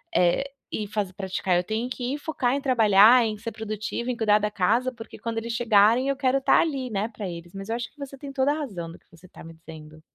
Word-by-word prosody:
eh, 175 +8 +3 0.3
e 215 - -3
faz 200 -2 -3
praticar. 190 -1 -1
Eu 175 - +2
tenho 220 +6 -2
que 255 +2 -3
focar 285 -5 -1
em 280 - 0
trabalhar, 230 -2 +6
em 215 -2 -2
ser 230 +2 -6
produtiva, 215 +2 -4
em 245 - -5
cuidar 210 -2 +3
da 210 0 -1
casa, 230 +7 +1
porque 230 -2 -11
quando 230 -1 -4
eles 230 +1 -3
chegarem, 230 +2 +4
eu 275 - +1
quero 270 0 +1
tá - - +4
ali, 275 -6 -2
né, 210 -1 -1
pra 210 -4 -6
eles". 170 0 -9
Mas 195 +1 -8
eu 225 - 0
acho 240 -1 -5
que - - -37
você 275 -1 -8
tem 275 0 -9
toda 270 +1 +2
a - - -3
razão 195 - -5
do 170 - -12
que - - -37
você 170 +2 -17
tá - - -14
me 165 +1 -11
dizendo. 155 -2 -13
220 Hz, 255 wpm, -25 LUFS, 195-255 Hz, 0.3 s, trabalhar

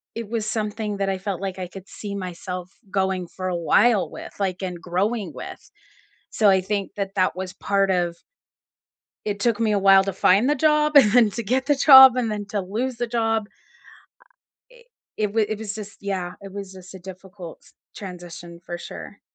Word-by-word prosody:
it 230 -1 -5
was 225 -2 -2
something 215 -1 -3
that 195 0 -1
I 190 - -1
felt 195 -1 -4
like 190 -1 -4
I 180 - -4
could 190 +1 -12
see 205 -2 -7
myself 180 -1 -6 0.2
going 190 -2 -1
for 185 +2 -6
a 180 - -2
while 200 +6 +3
with, - - -9
like, 190 -2 -2
and 180 -2 -5
growing 200 +5 -2
with, - - -10 0.6
so 215 - +2
I 190 -1 +4
think 200 +1 -3
that 195 -1 -4
that 185 -2 +1
was 185 0 -5
part 200 0 0
of 175 -2 0 1.1
It 205 -1 -2
took 230 +1 +1
me 225 -2 +2
a 205 - +2
while 195 0 +6
to 195 - -2
find 195 +7 +3
the - - +3
job, 300 +1 +3
and 230 -4 +6
to 235 - -4
get 260 +5 0
the 290 -1 +3
job, 265 -2 +9
and 240 -3 0
then 210 -1 -3
to 205 0 -2
lose 230 +7 -3
the 240 +1 -2
job. 225 -2 -1 1.2
I - - -18
i 480 - -19 0.3
it 210 -2 -1
was 220 -1 +2
it 215 0 -3
was 210 -1 -5
just 210 -2 -9
yeah. 190 -3 -3
It 195 -1 -10
was 195 -1 -8
just 185 0 -13
a 190 - -10
difficult 185 -1 -11 0.3
transition, 175 -3 -9
for 175 - -5
sure. 200 +3 -10
200 Hz, 200 wpm, -23 LUFS, 185-220 Hz, 1.2 s, job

